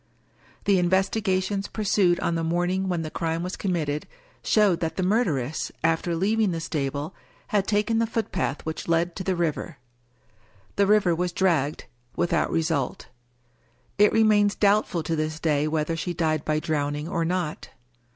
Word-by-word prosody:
The 200 -2 +4
investigations 190 +1 +1
pursued 195 -4 +2
on 170 - 0
the 165 0 -1
morning 175 +3 0
when 175 -2 -1
the 155 - -6
crime 165 0 -2
was 180 +1 -4
committed 155 -6 -2 0.4
showed 205 -6 +3
that 160 -3 -2
the 185 - -1
murderess, 165 - 0
after 165 +1 +1
leav 210 +6 +1
ing 210 - +3
the 165 -2 -2
stable, 150 0 -3 0.4
had 200 -2 +1
taken 215 +2 +1
the 230 - +1
footpath 220 - -2
which 160 0 -5
led 170 +1 +1
to 185 - -4
the 185 0 0
river. 165 -2 -2 1.0
The 200 -1 +3
river 205 -4 +4
was 175 +1 -1
dragged 160 -7 0 0.2
— 120 0 -35
^without 175 - +1
result. 160 -5 -1 0.9
It 210 0 +6
remains 210 -2 +4
doubtful 200 -4 +2
to 165 +1 -1
this 155 0 -2
day 150 -2 +1
whether 155 +1 -1
she 175 +2 -3
died 155 -2 0
by 155 0 +1
drowning 150 -1 -2
or 170 -2 -1
not. 170 -2 -2
175 Hz, 160 wpm, -25 LUFS, 160-195 Hz, 1.0 s, It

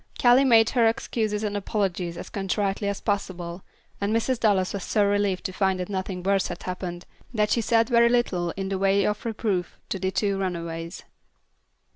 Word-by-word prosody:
Callie 250 +2 +6
made 225 -3 +5
her 235 -3 +4
excuses 220 -2 -1
and 205 -1 -2
apologies 190 -4 -2
as - - -7
contritely 200 +1 -1
as 200 -1 -2
possible, 185 -4 -3 0.4
and 200 +1 0
Mrs. 230 +2 +1
Dallas 195 -5 +2
was 200 -2 -4
so 210 -2 +2
relieved 200 -2 +1
to 185 - -4
find 190 -1 +1
that 180 - -4
nothing 190 -2 -3
worse 195 0 +2
had - - -7
happened, 180 -1 -5 0.3
that 210 -1 +1
she 235 - +3
said 225 0 +3
very 235 -1 +5
little 195 -8 +1
in 195 -1 -3
the 195 -1 -2
way 195 0 +3
of 210 0 -1
reproof 210 -5 -2
to 195 - -2
the 190 - 0
two 200 0 0
runaways. 170 -2 -4
200 Hz, 185 wpm, -25 LUFS, 185-215 Hz, 0.4 s, Callie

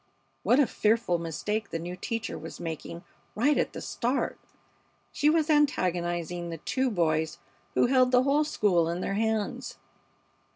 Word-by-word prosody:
What 250 - +4
a 290 - +6
fearful 220 -5 +1
mistake 210 +7 -3
the - - -3
new 175 +2 -5
teacher 225 +3 -4
was - - -8
making 165 +1 -6 0.3
right 285 +7 +3
at - - 0
the - - -6
start! 250 +3 -1 0.7
She 295 - +2
was 315 -1 +3
antagonizing 175 - +1
the 165 - -5
two 260 - -1
boys 160 -6 0 0.4
who - - +4
held 255 0 +4
the 250 0 +5
whole 285 +3 +3
school 180 - +2
in 170 +2 -2
their 195 - -2
hands. 220 0 -1
210 Hz, 155 wpm, -28 LUFS, 170-255 Hz, 0.7 s, a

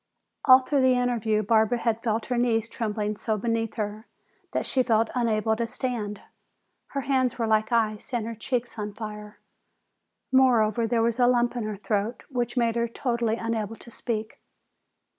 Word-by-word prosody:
All 260 -1 +8
through 275 +1 +1
the 260 -1 +4
interview 230 -3 +1
Barbara 220 +2 +3
had 230 -1 -1
felt 225 -1 -1
her 250 - -1
knees 230 -2 +1
trembling 215 -2 -3
so 220 0 -1
beneath 225 +1 -1
her 215 0 -4 0.4
that - - -1
she 260 - +1
felt 225 -2 +2
unable 220 -3 +1
to 230 +1 -2
stand. 225 -4 -4 0.7
Her 280 - -3
hands 260 -1 +1
were 230 - 0
like 220 0 +1
ice 220 -1 0
and 235 -3 -1
her 230 - -4
cheeks 235 +1 -3
on 210 0 -4
fire; 210 -1 -8 0.9
moreover, 235 -4 +4
there 230 -1 +1
was 235 +1 0
a 245 - +5
lump 240 0 +2
in 235 -3 -2
her 215 -1 -4
throat 210 +3 -2
which 245 -1 -2
made 235 -1 +2
her 235 0 +1
totally 235 -1 -1
unable 225 -1 -3
to 235 - -14
speak. 220 -2 -4
230 Hz, 175 wpm, -26 LUFS, 215-245 Hz, 0.9 s, All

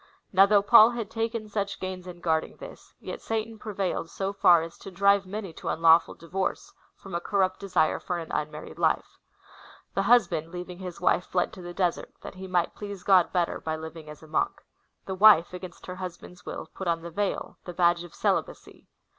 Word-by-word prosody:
Now 195 +1 +7
though 200 -1 +4
Paul 220 +1 +8
had 235 -3 -5
taken 225 -1 -2
such 200 -1 -3
pains 185 -1 -6
in 175 -1 -10
guarding 160 -2 0
this, - - -12
yet - - -7
Satan 225 0 -3
prevailed 195 -6 -3
so 195 +2 -3
far 175 -4 +5
as 165 - -8
to 195 - -9
drivc^ 200 +1 +3
many 200 -3 -6
to - - -9
unlawful 165 0 +4
divorce, 195 - -4 0.2
from 195 - -12
a 170 - 0
corrupt 190 -1 0
desire 185 -5 +1
for 180 - -3
an 165 -1 -7
unmarried 150 0 -4
life/^ - - 0 0.7
The 195 - +1
husband, 195 -7 +3
leaving 180 0 -7
his 180 -2 -7
wife, 180 0 +2
fled 180 -1 0
to 185 - -10
the 175 0 -7
desert, 180 -3 -1
that - - -8
he 190 0 -9
might 180 -2 0
please 200 -3 -8
God 185 -3 +4
better 175 -2 0
by 160 0 -2
living 160 0 -9
as 150 +1 -11
a - - -13
monk. 155 - -1 0.4
The 190 - -4
wife, 190 -3 +6
against 180 -1 -9
her 185 0 -7
husband's 180 -1 -9
will, - - -6
put 190 - -6
on 165 -1 0
the 170 - -7
veil 205 +4 -3
— - - -39
tlie 180 - -6
badge 175 -1 +3
of 175 - -12
celibacy. - - -2
185 Hz, 205 wpm, -27 LUFS, 170-200 Hz, 0.7 s, Paul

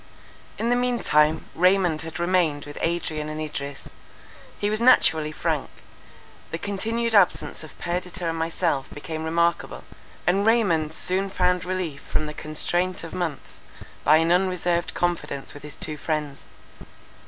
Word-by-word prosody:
In 230 +2 0
the - - +4
mean 245 0 +1
time, 150 +1 +3
Raymond 180 -3 +3
had 160 0 -7
remained 170 -5 +1
with 145 - -8
Adrian 160 -3 -1
and 155 0 -5
Idris. 140 -2 -5 0.7
He 205 - -1
was 215 +1 0
naturally 160 -11 +5
frank; - - -2 0.8
the 165 - -3
continued 225 +5 -1
absence 195 -5 +3
of 155 - -12
Perdita 180 0 -3
and 165 - -1
myself 165 -3 -1
became 160 +1 -5
remarkable; 170 +1 0 0.4
and 190 +4 +3
Raymond 195 -9 +3
soon 190 +4 0
found 180 -2 +1
relief 180 -6 -3
from 155 - -2
the 150 - -5
constraint 175 +5 -1
of 165 - -8
months, 170 -6 -4 0.4
by 155 - +6
an 165 +1 +2
unreserved 180 -1 +1
confidence 175 -5 -2
with 145 - -10
his 150 0 -8
two 155 -1 -6
friends. 150 -2 -2
170 Hz, 145 wpm, -25 LUFS, 155-185 Hz, 0.8 s, by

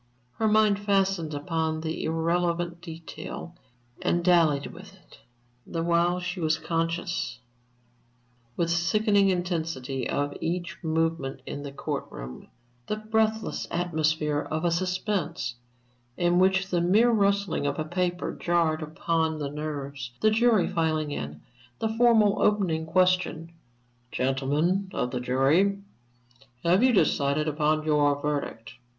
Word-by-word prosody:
Her 220 - +2
mind 215 -1 +4
fastened 195 -6 +1
upon 160 +1 -2
the 160 0 -3
irrelevant 170 +1 0
detail 170 0 -8 0.5
and 175 0 0
dallied 160 -6 +3
with 195 +2 -12
it; 185 -4 -20 0.5
the 165 -1 -3
while 170 +1 +2
she 180 0 -4
was 155 -2 +1
conscious, 165 -3 -2 1.2
with 170 -1 +1
sickening 200 +4 +3
intensity, 165 -8 -2
of 145 0 -1
each 175 +2 -2
movement 160 -4 -1
in 145 - -5
the 140 -1 -6
court 140 - -4
room 65 +1 -9 0.4
the 210 - -1
breathless 220 0 -1
atmosphere 155 -3 0
of 155 +3 -3
a 170 - +2
suspense, 180 - -1 0.6
in 175 0 +3
which 190 +1 +3
the 175 -3 +1
mere 210 +8 +4
rustling 200 -7 +1
of 140 - -2
a 155 - -2
paper 175 +2 -2
jarred 170 -2 +1
upon 160 +1 -1
the 145 -2 -4
nerves; 140 -4 -5
the 215 - +4
jury 225 -3 +3
filing 155 -2 0
in, 75 - -5 0.4
the 220 - -1
formal 225 -3 +4
opening 175 -6 +1
question, 180 -2 +1 0.6
"Gentlemen 145 +9 0
of 125 - -1
the 125 - -2
jury, 135 +11 +2 0.9
have 180 +4 +4
you 260 +1 +5
decided 150 -7 +2
upon 155 +1 +1
your 145 -2 +3
verdict?" 145 -6 -3
170 Hz, 130 wpm, -27 LUFS, 150-185 Hz, 1.2 s, you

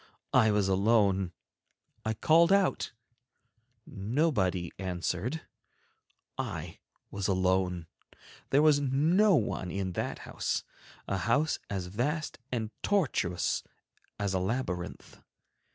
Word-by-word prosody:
I 110 - +6
was 105 -2 +2
alone; 95 -2 +3 0.7
I 110 0 -1
called 165 - +5
out, 200 -1 +2 0.9
nobody 100 - 0
answered, 95 - -2 1.0
I 90 - -4 0.3
was 100 -1 -2
alone; 95 -2 +1 0.6
there 145 +2 +4
was 150 -2 +6
no 160 +9 +4
one 105 - -1
in 95 0 -2
that - - -3
house—a 100 - -4
house 120 - +1
as 95 -3 -2
vast 140 - -2
and 115 -3 -2
tortuous 90 - +1 0.6
as 100 -2 -1
a 95 - +1
labyrinth. 95 -3 -3
105 Hz, 100 wpm, -30 LUFS, 95-140 Hz, 1.0 s, I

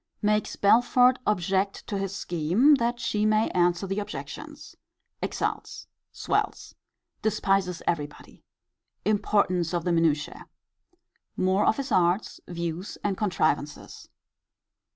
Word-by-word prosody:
Makes 210 0 +1
Belford 245 +4 +4
object 195 0 0
to 205 - -4
his 195 0 -3
scheme, 180 - +3
that 240 0 0
he 215 -3 -1
may 215 +1 +3
answer 175 +1 +1
the 195 +2 -2
objections. 205 - -8 0.5
Exults. - - -3 0.3
Swells. - - -2 0.5
Despises 195 -4 0
every 150 -4 0
body. 150 - -17 0.6
Importance 200 -4 +1
of 170 - -1
the 180 - 0
minutiae. 160 -3 0 0.9
More 190 +2 +2
of - - +3
his 275 -1 -4
arts, 180 +3 +1
views, 170 +2 -5
and 200 -2 0
contrivances. 155 -7 -2
195 Hz, 110 wpm, -26 LUFS, 175-210 Hz, 0.9 s, Belford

